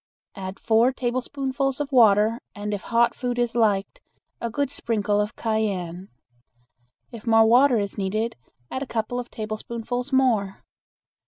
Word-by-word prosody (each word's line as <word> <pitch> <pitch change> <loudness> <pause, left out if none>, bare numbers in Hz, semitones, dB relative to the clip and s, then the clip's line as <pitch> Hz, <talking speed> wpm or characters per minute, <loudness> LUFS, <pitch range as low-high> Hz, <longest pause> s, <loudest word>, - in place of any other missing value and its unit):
Add 190 0 -7
four 230 +3 +3
tablespoonfuls 265 +2 -2
of 290 -1 -3
water 225 -1 +4
and 210 0 -4
if 200 - -3
hot 235 0 +2
food 245 -1 -3
is 240 -1 0
liked, 220 - +1 0.4
a 235 - -2
good 280 +3 -1
sprinkle 210 -6 0
of 210 +2 -3
cayenne. 195 -5 -2 1.0
If 230 -1 -10
more 225 0 +6
water 245 +2 +5
is 200 -1 -2
needed, 215 +4 -1 0.4
add 260 - -3
a 275 - -4
couple 230 +1 -2
of 245 - -6
tablespoonfuls 230 +4 -4
more. 230 -8 +1
230 Hz, 145 wpm, -24 LUFS, 210-250 Hz, 1.0 s, more